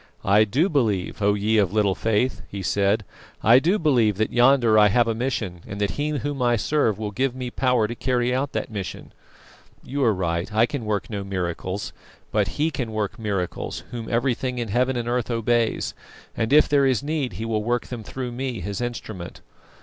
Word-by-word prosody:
"I 105 Hz, +3 st, +5 dB
do 135 Hz, -, +2 dB
believe, 110 Hz, -, 0 dB
O 100 Hz, 0 st, +3 dB
you 105 Hz, +1 st, +2 dB
of 95 Hz, -3 st, 0 dB
little 105 Hz, -3 st, +3 dB
faith!" 115 Hz, +5 st, 0 dB
he 100 Hz, -1 st, -6 dB
said. 100 Hz, +3 st, +1 dB, 0.4 s
"I 115 Hz, +5 st, +7 dB
do 175 Hz, +9 st, +2 dB
believe 120 Hz, -, +2 dB
that 110 Hz, 0 st, -1 dB
yonder 120 Hz, -2 st, +5 dB
I 105 Hz, -, +7 dB
have 115 Hz, +3 st, +3 dB
a 115 Hz, -, +1 dB
mission, 110 Hz, -7 st, -3 dB
and 100 Hz, -, -6 dB
that 100 Hz, -1 st, 0 dB
He 145 Hz, +1 st, -2 dB
Whom 145 Hz, -2 st, -3 dB
I 120 Hz, -1 st, +3 dB
serve 115 Hz, -2 st, +1 dB
will 105 Hz, -1 st, -4 dB
give 130 Hz, +4 st, -1 dB
me 125 Hz, -1 st, -5 dB
power 125 Hz, -4 st, +2 dB
to 120 Hz, -, -4 dB
carry 125 Hz, 0 st, 0 dB
out 135 Hz, +2 st, -1 dB
that -, -, -3 dB
mission. 100 Hz, -4 st, -6 dB, 0.7 s
You 140 Hz, +1 st, -2 dB
are 115 Hz, -, +4 dB
right, 85 Hz, +1 st, -2 dB
I 110 Hz, +2 st, +4 dB
can 125 Hz, -2 st, -5 dB
work 105 Hz, +1 st, -2 dB
no 100 Hz, -2 st, -3 dB
miracles; 95 Hz, 0 st, -3 dB, 0.4 s
but -, -, 0 dB
He 155 Hz, +2 st, +1 dB
can 125 Hz, -5 st, -3 dB
work 110 Hz, +1 st, -3 dB
miracles 100 Hz, -5 st, -3 dB
Whom 115 Hz, -2 st, -6 dB
everything 125 Hz, +1 st, 0 dB
in 120 Hz, -3 st, -3 dB
heaven 125 Hz, +5 st, +1 dB
and 120 Hz, -1 st, -3 dB
earth 120 Hz, -1 st, -1 dB
obeys, 115 Hz, 0 st, 0 dB, 0.4 s
and 115 Hz, +1 st, -1 dB
if 150 Hz, +1 st, +6 dB
there 140 Hz, -2 st, +3 dB
is 130 Hz, 0 st, +1 dB
need 145 Hz, -6 st, -2 dB
He 110 Hz, +6 st, -5 dB
will 110 Hz, -2 st, -1 dB
work 120 Hz, +2 st, 0 dB
them 120 Hz, -3 st, -7 dB
through 125 Hz, +3 st, -5 dB
me, 125 Hz, -1 st, -3 dB
His 100 Hz, +5 st, -4 dB
instrument. 110 Hz, -7 st, -6 dB
115 Hz, 205 wpm, -24 LUFS, 105-130 Hz, 0.7 s, I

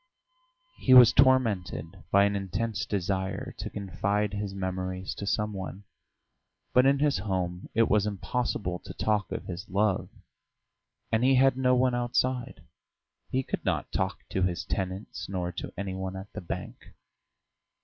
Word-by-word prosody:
He 130 Hz, -, +5 dB
was 125 Hz, -2 st, +10 dB
tormented 100 Hz, -, +2 dB
by 100 Hz, 0 st, +5 dB
an 100 Hz, 0 st, +2 dB
intense 100 Hz, +2 st, -2 dB
desire 95 Hz, 0 st, -2 dB
to -, -, -4 dB
confide 100 Hz, +2 st, -1 dB
his 100 Hz, -1 st, -3 dB
memories 95 Hz, 0 st, -3 dB
to 100 Hz, -, -6 dB
some 105 Hz, +1 st, 0 dB
one. 95 Hz, +1 st, -6 dB, 0.9 s
But 125 Hz, +1 st, +6 dB
in 140 Hz, 0 st, +4 dB
his 145 Hz, -6 st, +2 dB
home 90 Hz, -2 st, -3 dB
it 115 Hz, 0 st, +4 dB
was 105 Hz, -1 st, +3 dB
impossible 100 Hz, -3 st, -2 dB
to -, -, -10 dB
talk 105 Hz, -4 st, 0 dB
of -, -, -4 dB
his 90 Hz, +3 st, -7 dB
love, 100 Hz, +1 st, +1 dB, 1.0 s
and 110 Hz, +2 st, +2 dB
he 135 Hz, +1 st, +5 dB
had 135 Hz, 0 st, +5 dB
no 125 Hz, -1 st, +3 dB
one 125 Hz, 0 st, +3 dB
outside; 120 Hz, +1 st, -1 dB, 0.7 s
he 130 Hz, +1 st, 0 dB
could -, -, -4 dB
not -, -, -1 dB
talk -, -, -2 dB
to 95 Hz, -, -1 dB
his 90 Hz, -3 st, 0 dB
tenants 95 Hz, +2 st, -4 dB
nor 90 Hz, -2 st, -2 dB
to 90 Hz, -, -6 dB
any 100 Hz, -1 st, -3 dB
one 95 Hz, 0 st, -4 dB
at 95 Hz, +2 st, -9 dB
the -, -, -5 dB
bank. 85 Hz, -, -7 dB
100 Hz, 155 wpm, -28 LUFS, 95-115 Hz, 1.0 s, was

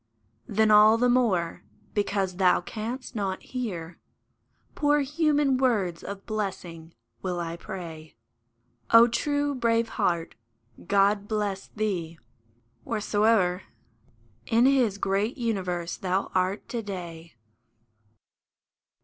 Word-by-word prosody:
Then 215 Hz, +1 st, +2 dB
all 215 Hz, +1 st, +7 dB
the 245 Hz, +1 st, +3 dB
more, 195 Hz, -10 st, +1 dB, 0.3 s
because 200 Hz, -3 st, -1 dB
thou 185 Hz, -2 st, +4 dB
canst 230 Hz, +9 st, -6 dB
not 195 Hz, -3 st, -3 dB
hear 185 Hz, -10 st, -5 dB, 0.7 s
Poor 295 Hz, 0 st, +2 dB
human 295 Hz, -2 st, +1 dB
words 205 Hz, -10 st, 0 dB
of 200 Hz, 0 st, -7 dB
blessing, 180 Hz, -6 st, -5 dB, 0.3 s
will 180 Hz, -2 st, -3 dB
I 170 Hz, -1 st, -4 dB
pray, 170 Hz, -4 st, -8 dB, 0.7 s
O 230 Hz, +1 st, +8 dB
true, 285 Hz, +4 st, 0 dB
brave 230 Hz, -2 st, +1 dB
heart! 170 Hz, -2 st, -1 dB, 0.5 s
God 200 Hz, +1 st, +2 dB
bless 205 Hz, -3 st, -2 dB
thee, 180 Hz, -7 st, -3 dB, 0.7 s
whereso'er 205 Hz, -3 st, +1 dB, 0.9 s
In 230 Hz, +2 st, +4 dB
His 255 Hz, -7 st, +3 dB
great 200 Hz, +5 st, -1 dB
universe 185 Hz, -8 st, -2 dB
thou 190 Hz, +1 st, -1 dB
art 185 Hz, +2 st, 0 dB
to 235 Hz, -, -3 dB
day 170 Hz, -, -8 dB
205 Hz, 105 wpm, -26 LUFS, 180-230 Hz, 0.9 s, O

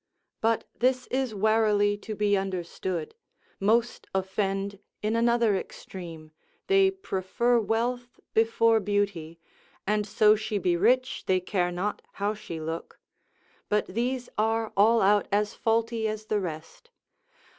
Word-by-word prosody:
But 225 Hz, 0 st, +2 dB
this 255 Hz, +1 st, +1 dB
is 260 Hz, -4 st, -1 dB
warily 210 Hz, -1 st, +3 dB
to 215 Hz, +1 st, -7 dB
be 205 Hz, 0 st, +2 dB
understood, 185 Hz, -3 st, -3 dB, 0.5 s
most 230 Hz, +4 st, +1 dB
offend 195 Hz, +1 st, -1 dB, 0.2 s
in 215 Hz, +2 st, +1 dB
another 235 Hz, -2 st, +3 dB
extreme, 165 Hz, -4 st, -8 dB, 0.3 s
they 390 Hz, 0 st, +5 dB
prefer 240 Hz, -, 0 dB
wealth 240 Hz, +3 st, -2 dB
before 225 Hz, 0 st, +4 dB
beauty, 195 Hz, -5 st, -2 dB, 0.5 s
and 210 Hz, +1 st, 0 dB
so 215 Hz, +1 st, +5 dB
she 215 Hz, 0 st, -2 dB
be 180 Hz, -2 st, +1 dB
rich, 250 Hz, +8 st, +1 dB
they 185 Hz, -1 st, +3 dB
care 180 Hz, -1 st, -1 dB
not 185 Hz, +4 st, -2 dB
how 205 Hz, +1 st, -1 dB
she 170 Hz, -6 st, -7 dB
look; 160 Hz, +1 st, -6 dB, 0.7 s
but 210 Hz, 0 st, +2 dB
these 245 Hz, +5 st, -2 dB
are 225 Hz, 0 st, 0 dB
all 225 Hz, +3 st, +5 dB
out 205 Hz, +1 st, +4 dB
as 210 Hz, +1 st, +1 dB
faulty 225 Hz, 0 st, 0 dB
as 215 Hz, 0 st, -4 dB
the 215 Hz, -1 st, 0 dB
rest. 165 Hz, -, -7 dB
210 Hz, 130 wpm, -27 LUFS, 190-230 Hz, 0.7 s, they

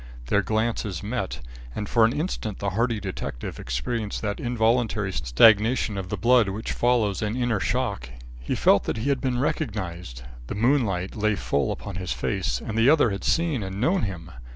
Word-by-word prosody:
Their 105 Hz, -, +3 dB
glances 110 Hz, -3 st, -1 dB
met, 100 Hz, -8 st, -3 dB, 0.3 s
and 105 Hz, -, -3 dB
for 115 Hz, +1 st, +4 dB
an 115 Hz, -, +2 dB
instant 130 Hz, -, -3 dB
the 100 Hz, -1 st, -2 dB
hardy 115 Hz, +2 st, 0 dB
detective 95 Hz, -10 st, -5 dB
experienced 100 Hz, -, -3 dB
that 105 Hz, -1 st, -2 dB
involuntary 115 Hz, -4 st, +1 dB
stagnation 105 Hz, -, +4 dB
of 95 Hz, -2 st, -5 dB
the -, -, -2 dB
blood 120 Hz, -2 st, +4 dB
which 105 Hz, +4 st, -4 dB
follows 120 Hz, -5 st, +1 dB
an 105 Hz, +2 st, -1 dB
inner 120 Hz, -4 st, 0 dB
shock. 105 Hz, -, -1 dB, 0.3 s
He -, -, -3 dB
felt -, -, +4 dB
that -, -, -2 dB
he 115 Hz, +6 st, -1 dB
had 140 Hz, -2 st, +1 dB
been 130 Hz, -2 st, 0 dB
recognised. 90 Hz, -, -3 dB, 0.2 s
The -, -, -4 dB
moonlight 105 Hz, -6 st, +1 dB
lay 110 Hz, -1 st, +1 dB
full 70 Hz, -6 st, 0 dB
upon 100 Hz, -4 st, -6 dB
his 95 Hz, 0 st, -2 dB
face, -, -, -1 dB
and 110 Hz, -, -6 dB
the 115 Hz, +4 st, +5 dB
other 145 Hz, -7 st, +4 dB
had 100 Hz, -, -4 dB
seen 165 Hz, -7 st, +1 dB
and 95 Hz, 0 st, -5 dB
known 175 Hz, -, +2 dB
him. 85 Hz, -4 st, -5 dB
105 Hz, 180 wpm, -25 LUFS, 95-120 Hz, 0.3 s, the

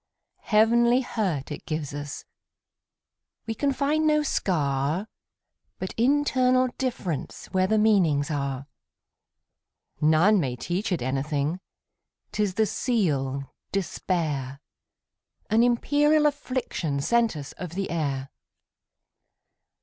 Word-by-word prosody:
Heavenly 235 Hz, +3 st, +4 dB
hurt 185 Hz, -, -2 dB
it 145 Hz, -, -7 dB
gives 155 Hz, -3 st, -3 dB
us; 145 Hz, 0 st, -6 dB, 1.2 s
We 225 Hz, -, -2 dB
can 280 Hz, +5 st, 0 dB
find 300 Hz, +3 st, +1 dB
no 300 Hz, 0 st, +3 dB
scar, 155 Hz, -, 0 dB, 0.7 s
But 185 Hz, -, -5 dB
internal 255 Hz, 0 st, +3 dB
differenceWhere 185 Hz, -, -2 dB
the 220 Hz, -, +3 dB
meanings 175 Hz, -10 st, +3 dB
are. 140 Hz, -2 st, -2 dB, 1.4 s
None 160 Hz, +7 st, +5 dB
may 130 Hz, -7 st, -1 dB
teach 185 Hz, -, -3 dB
it 170 Hz, -9 st, 0 dB
anything,'T 145 Hz, +11 st, -5 dB
is 200 Hz, -3 st, 0 dB
the 220 Hz, -, +3 dB
seal, 140 Hz, -, -1 dB, 0.2 s
despair,—An 160 Hz, -, -3 dB
imperial 290 Hz, +5 st, +3 dB
afflictionSent 235 Hz, -, 0 dB
us 145 Hz, -2 st, -7 dB
of 175 Hz, -2 st, -6 dB
the 195 Hz, 0 st, -2 dB
air. 140 Hz, -5 st, -2 dB
185 Hz, 95 wpm, -26 LUFS, 145-235 Hz, 1.4 s, None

